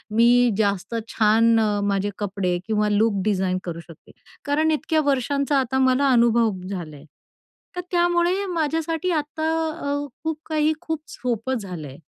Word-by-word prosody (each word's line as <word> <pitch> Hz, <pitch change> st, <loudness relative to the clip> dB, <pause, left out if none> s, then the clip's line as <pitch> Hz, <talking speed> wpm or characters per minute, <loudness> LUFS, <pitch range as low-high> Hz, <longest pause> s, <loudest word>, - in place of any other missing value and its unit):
मी 240 Hz, +1 st, +5 dB
जास्त 200 Hz, +1 st, -1 dB
छान 225 Hz, +1 st, +3 dB
अ, 210 Hz, -2 st, +1 dB
माझे 200 Hz, 0 st, 0 dB
कपडे 195 Hz, -3 st, -1 dB
किंवा 210 Hz, -1 st, +1 dB
लूक 205 Hz, -1 st, +2 dB
डिझाईन 190 Hz, -3 st, +1 dB
करू 170 Hz, -2 st, -5 dB
शकते. 170 Hz, -2 st, -15 dB, 0.3 s
कारण 305 Hz, +2 st, +2 dB
इतक्या 315 Hz, +1 st, +1 dB
वर्षांचा 280 Hz, +1 st, +1 dB
आता 265 Hz, 0 st, -1 dB
मला 260 Hz, +1 st, +3 dB
अनुभव 235 Hz, -2 st, +4 dB, 0.2 s
झाला 170 Hz, -6 st, -6 dB
आहे, 145 Hz, +1 st, -14 dB, 0.7 s
तर 360 Hz, -, -2 dB
त्यामुळे 350 Hz, +2 st, +2 dB
माझ्यासाठी 325 Hz, +2 st, -1 dB
आता 315 Hz, 0 st, -2 dB, 0.4 s
अ, 285 Hz, 0 st, -2 dB, 0.2 s
खूप 320 Hz, -1 st, -2 dB
काही 310 Hz, 0 st, +2 dB
खूप 320 Hz, -1 st, -3 dB
सोपं 245 Hz, +1 st, -3 dB
झालं 180 Hz, -8 st, -7 dB
आहे. 135 Hz, -, -11 dB
240 Hz, 150 wpm, -23 LUFS, 205-300 Hz, 0.7 s, मी